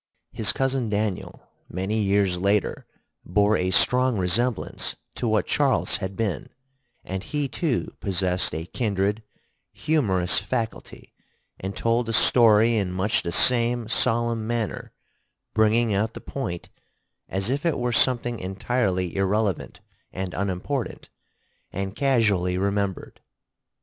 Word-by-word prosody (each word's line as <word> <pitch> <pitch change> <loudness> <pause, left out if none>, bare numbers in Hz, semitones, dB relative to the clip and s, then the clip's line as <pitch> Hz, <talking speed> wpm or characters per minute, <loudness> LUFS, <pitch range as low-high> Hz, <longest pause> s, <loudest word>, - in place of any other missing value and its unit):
His 110 - 0
cousin 135 -3 -1
Daniel 105 -2 -3 0.2
many 95 +5 -2
years 100 -3 +1
later 100 +2 0 0.4
bore 105 +4 +2
a 90 -2 0
strong 125 +4 +4
resemblance 105 +5 -1 0.2
to - - -2
what - - +2
Charles - - +1
had 95 +1 -5
been, 105 -8 -2 0.5
and 95 0 -4
he 145 +2 -2
too 135 0 -2
possessed 90 -4 -1
a 80 +1 -4
kindred 105 0 -1 0.5
humorous 100 - +1
faculty 115 -3 -5 0.5
and 95 +1 -5
told 115 0 +1
a - - -1
story 115 0 +5
in 95 -3 -1
much 95 +3 0
the 85 - -4
same 120 +3 +3
solemn 115 -1 0
manner, 115 -3 -3 0.6
bringing 110 +1 +3
out 110 +3 0
the - - -6
point 100 -11 -5 0.6
as 95 +5 -1
if 140 +2 -1
it 170 -3 +1
were 120 -1 -1
something 120 -1 +2
entirely 95 -2 -1
irrelevant 100 0 -1 0.3
and 95 -1 -5
unimportant 100 +7 -3 0.6
and 95 +1 -4
casually 105 -10 +2
remembered. 100 0 -2
105 Hz, 125 wpm, -24 LUFS, 95-120 Hz, 0.6 s, story